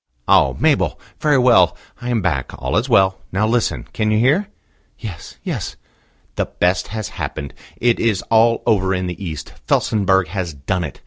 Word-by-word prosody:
"Oh! - - +4
Mabel. - - +2 0.2
Very 150 -2 +3
well. 115 -10 +5 0.2
I 120 - -4
am 115 -5 0
back: 70 -8 -1
all 65 +2 -2
is 120 +6 +1
well. 95 -4 +4
Now 100 +3 +1
listen. 115 +2 0
Can 110 -1 0
you 110 - +2
hear?" 145 - +3 0.5
"Yes, 95 -8 -8
yes." - - -4 0.6
"The - - +1
best 90 +1 0
has 110 +1 -4
happened. 70 -2 -4 0.2
It 120 -1 +2
is 110 -5 +1
all 115 +1 +4
over 95 -4 +2
in 90 0 -2
the 90 +2 -5
East. 80 -4 -6
Felsenburgh 95 -4 +2
has 90 -4 -4
done 85 +7 -2
it. 75 - -7
95 Hz, 175 wpm, -19 LUFS, 90-115 Hz, 0.6 s, well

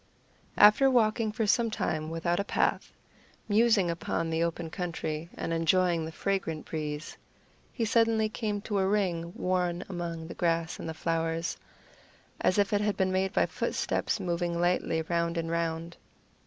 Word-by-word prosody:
After 210 +6 +7
walking 225 -3 +2
for 220 +1 -1
some 230 +3 +3
time 155 -7 -2
without 165 +1 -1
a - - +1
path, - - 0 0.6
musing 210 -4 +4
upon 165 0 -2
the 160 0 0
open 170 -1 -2
country 165 -3 -4
and 165 - -3
enjoying 165 0 +2
the 160 - -6
fragrant 165 -3 -2
breeze, 150 -1 -4 0.6
he 230 - -1
suddenly 225 -1 +3
came 215 -2 -3
to 205 -1 -1
a 190 - +2
ring 180 -5 0
worn 180 -1 0
among 170 -3 -5
the 165 - -7
grass 165 -1 -1
and - - -5
the 160 - -5
flowers, 165 +1 -1 0.8
as 185 - +2
if 200 0 +2
it 205 - +2
had 210 -1 0
been 190 0 +1
made 190 0 +1
by - - +3
footsteps - - -1
moving 175 -2 -1
lightly 175 -2 +1
round 170 +1 -1
and 165 0 -2
round. 165 0 -2
175 Hz, 160 wpm, -29 LUFS, 165-205 Hz, 0.8 s, After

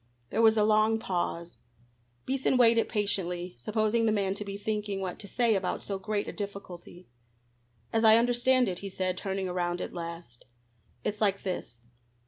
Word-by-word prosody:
There 220 - +1
was 220 -1 +5
a 210 - +4
long 215 +1 +4
pause. 175 -4 -3 0.7
Beason 265 -1 +1
waited 230 -2 +5
patiently, 180 -4 -1
supposing 215 - +1
the - - +3
man 200 -2 +1
to 205 - -4
be 200 -1 -6
thinking 210 -1 -2
what 185 -2 -4
to 200 - -8
say 235 +2 +2
about 190 -3 -1
so 195 -1 -3
great 205 +1 -2
a - - -5
difficulty. 185 -3 -8 0.9
"As 225 - +2
I 220 0 +8
understand 245 +2 +3
it," 180 -2 -3
he 200 - -6
said, 185 -1 -1
turning 190 0 -3
around 175 -1 -1
at - - -5
last, 170 -8 -8 0.6
"it's 210 +1 -3
like 200 -2 +1
this. 120 -11 -5
200 Hz, 170 wpm, -29 LUFS, 180-220 Hz, 0.9 s, I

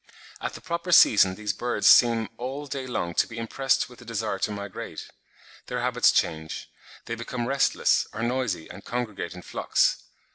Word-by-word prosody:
At - - -4
the - - -9
proper 170 +1 -3
season 100 - +6
these 105 0 -2
birds 120 -1 0
seem 115 -2 +6
all 135 +4 -5
day 135 -2 -5
long 85 -8 -2
to - - +2
be 115 - -10
impressed 130 +4 0
with 125 -1 -15
the 120 - -13
desire 110 -3 -3
to 105 - -1
migrate; 100 -1 -7 0.6
their - - -3
habits - - +3
change; 80 0 -2 0.3
they 115 - -4
become 120 +1 -4
restless, 135 +2 +2
are 110 +2 -5
noisy 120 -9 -1
and 100 - -11
congregate 115 -7 -4
in 90 - -10
flocks. - - +1
115 Hz, 175 wpm, -26 LUFS, 105-125 Hz, 0.6 s, season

